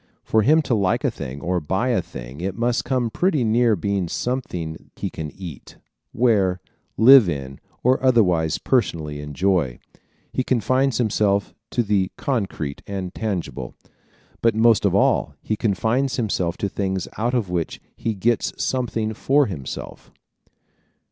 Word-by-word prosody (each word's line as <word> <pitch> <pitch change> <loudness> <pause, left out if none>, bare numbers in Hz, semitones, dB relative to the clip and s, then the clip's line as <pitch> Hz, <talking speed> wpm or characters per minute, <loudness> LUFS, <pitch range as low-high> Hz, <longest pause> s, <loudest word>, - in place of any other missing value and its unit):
For 110 - +2
him 155 +8 +4
to 130 - -1
like 100 -4 +1
a - - +2
thing 70 +1 -7
or 90 +1 0
buy 95 +10 -1
a 120 - +2
thing 65 +4 -9
it 95 +2 -3
must 120 +1 +1
come 125 -3 0
pretty 165 - +1
near 115 0 +3
being 100 0 -1
something 90 -9 -4
he - - -4
can 80 -1 -5
eat, 80 -5 -10 0.3
wear, 100 -6 +2 0.4
live 125 -3 +8
in 70 -3 -5 0.2
or 130 +2 +3
otherwise 90 - +3
personally 80 - -1
enjoy. 75 -3 0 0.6
He 130 - 0
confines 130 +1 +1
himself 105 -3 +1 0.2
to 120 - 0
the 100 -3 +1
concrete 95 - -2
and 95 -3 -4
tangible. 100 -6 -4 0.7
But 115 -2 +3
most 115 0 +4
of - - +2
all - - +2
he 110 - -1
confines 115 +6 0
himself 95 -7 -1
to 100 - -1
things 95 -2 -2
out 120 +3 0
of 105 -7 -1
which 85 -2 -2 0.2
he 115 -2 -2
gets 115 +5 0
something 115 -4 -1
for 140 +6 +3
himself. 75 - -7
105 Hz, 150 wpm, -22 LUFS, 90-120 Hz, 0.7 s, live